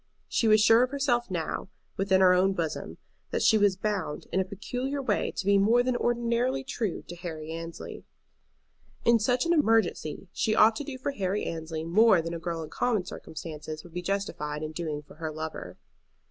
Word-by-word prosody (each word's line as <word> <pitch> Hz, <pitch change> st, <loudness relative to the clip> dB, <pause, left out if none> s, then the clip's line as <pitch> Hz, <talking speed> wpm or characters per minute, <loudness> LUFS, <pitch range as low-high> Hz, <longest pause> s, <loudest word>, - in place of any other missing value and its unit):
She 230 Hz, -, +1 dB
was 215 Hz, 0 st, +6 dB
sure 225 Hz, +3 st, +6 dB
of 250 Hz, -, +2 dB
herself 260 Hz, -4 st, 0 dB
now, 175 Hz, +1 st, -3 dB, 0.3 s
within 190 Hz, -1 st, +2 dB
her 185 Hz, -1 st, +7 dB
own 190 Hz, +2 st, +3 dB
bosom, 165 Hz, -4 st, -4 dB, 0.3 s
that -, -, -1 dB
she 220 Hz, -, +5 dB
was 205 Hz, -3 st, +4 dB
bound 190 Hz, -6 st, -3 dB
in 190 Hz, -, +1 dB
a -, -, +3 dB
peculiar 245 Hz, +8 st, -4 dB
way 235 Hz, -7 st, 0 dB
to -, -, -3 dB
be 200 Hz, 0 st, +4 dB
more 230 Hz, +5 st, +4 dB
than 255 Hz, 0 st, 0 dB
ordinarily 240 Hz, +3 st, 0 dB
true 225 Hz, -7 st, -3 dB
to 175 Hz, -, -9 dB
Harry 160 Hz, -3 st, -6 dB
Annesley. 165 Hz, 0 st, -7 dB, 1.0 s
In 235 Hz, -1 st, +5 dB
such 245 Hz, +5 st, +1 dB
an 340 Hz, -, +3 dB
emergency 225 Hz, -, +1 dB
she 215 Hz, -, +1 dB
ought 220 Hz, +1 st, +6 dB
to -, -, -3 dB
do 275 Hz, -2 st, -6 dB
for 260 Hz, +2 st, -2 dB
Harry 200 Hz, -4 st, -2 dB
Annesley 160 Hz, -1 st, -4 dB
more 190 Hz, +4 st, +5 dB
than 165 Hz, +1 st, -3 dB
a 170 Hz, -, -4 dB
girl 165 Hz, -1 st, -3 dB
in 155 Hz, -, -10 dB
common 220 Hz, -7 st, 0 dB
circumstances 155 Hz, -3 st, -7 dB
would 175 Hz, -, -14 dB
be 180 Hz, -, -3 dB
justified 170 Hz, -6 st, -3 dB
in 155 Hz, -, -4 dB
doing 155 Hz, -2 st, -4 dB
for 145 Hz, -, -17 dB
her 160 Hz, -1 st, -4 dB
lover. 155 Hz, -, -6 dB
195 Hz, 195 wpm, -28 LUFS, 165-235 Hz, 1.0 s, her